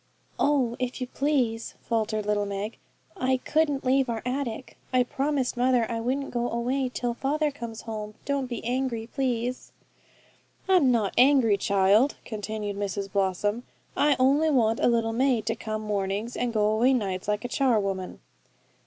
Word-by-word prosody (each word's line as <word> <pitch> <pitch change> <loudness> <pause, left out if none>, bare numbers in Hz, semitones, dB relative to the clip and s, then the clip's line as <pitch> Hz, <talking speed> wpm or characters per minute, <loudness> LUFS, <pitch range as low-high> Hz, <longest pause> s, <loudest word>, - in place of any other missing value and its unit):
'Oh, 270 -5 +2
if 250 0 -3
you 255 - -2
please,' 250 -4 -1
faltered 215 -2 -1
little 205 -1 0
Meg, 200 +2 -4 0.4
'I 260 -5 +1
couldn't 295 -3 +1
leave 265 0 +3
our 225 -1 -3
attic. 255 -1 -3 0.2
I 255 -1 +4
promised 270 +1 -1
mother 245 -1 +3
I 230 - -2
wouldn't 260 +4 -2
go 240 0 -1
away 255 +3 -1
till 245 -1 -2
father 295 +4 0
comes 235 -6 -7
home. 215 -2 -6
Don't 280 -2 -1
be 240 -3 -6
angry, 245 -2 -1
please.' 250 -1 -2 1.0
'I'm 355 -9 +5
not 220 -5 +1
angry, 255 -5 +5
child,' 200 +6 +3
continued 210 -2 -4
Mrs 200 -1 -3
Blossom. 200 +3 0 0.3
'I 290 -1 +3
only 280 +5 +3
want 230 -6 +2
a - - +3
little 230 -1 +1
maid 250 -2 +1
to 225 - 0
come 215 -1 -4
mornings, 205 +2 -2
and 245 -1 -1
go 215 -1 +2
away 240 +5 +3
nights, 190 -6 -2
like 210 +2 -1
a - - 0
char 255 -3 +2
woman.' 195 -2 -4
235 Hz, 160 wpm, -26 LUFS, 215-265 Hz, 1.0 s, I'm